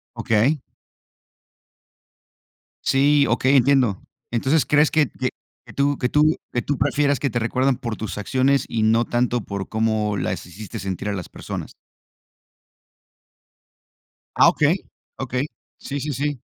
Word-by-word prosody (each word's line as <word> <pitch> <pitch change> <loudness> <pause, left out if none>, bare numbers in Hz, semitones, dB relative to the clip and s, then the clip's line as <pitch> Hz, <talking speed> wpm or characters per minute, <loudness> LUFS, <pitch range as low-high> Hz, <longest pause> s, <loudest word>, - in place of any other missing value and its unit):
Okey. 125 +7 +1 2.2
Sí, 140 +1 +4
okey, 130 +4 +2
entiendo. 130 -6 +3 0.3
Entonces, 135 +6 +2
¿crees 150 +1 +4
que 150 -4 +2
que 130 -1 -2 0.4
que - - -13
tú 140 0 +1
que 125 - 0
tú 155 +1 +3 0.2
qué 120 - -1
tú 145 -2 -1
prefieras, 145 0 +2
que 140 - 0
te 120 - -2
recuerdan 130 +3 +1
por 115 -4 -4
tus 110 -1 -6
acciones? 130 +6 +1
Y 115 - -2
no 115 +2 +3
tanto, 120 0 0
por 100 -1 -5
cómo 110 -2 0
las - - -3
hiciste 100 +3 -8
sentir, 95 +1 -4
a - - -1
las 95 -4 -6
personas. - - -7 2.6
Ah, - - +6
okey. 155 +5 +2 0.4
Okey. 130 +1 -2 0.3
Sí, 140 0 -5
sí, 150 +1 -3
sí. 145 -1 -2
130 Hz, 140 wpm, -22 LUFS, 110-140 Hz, 2.6 s, Ah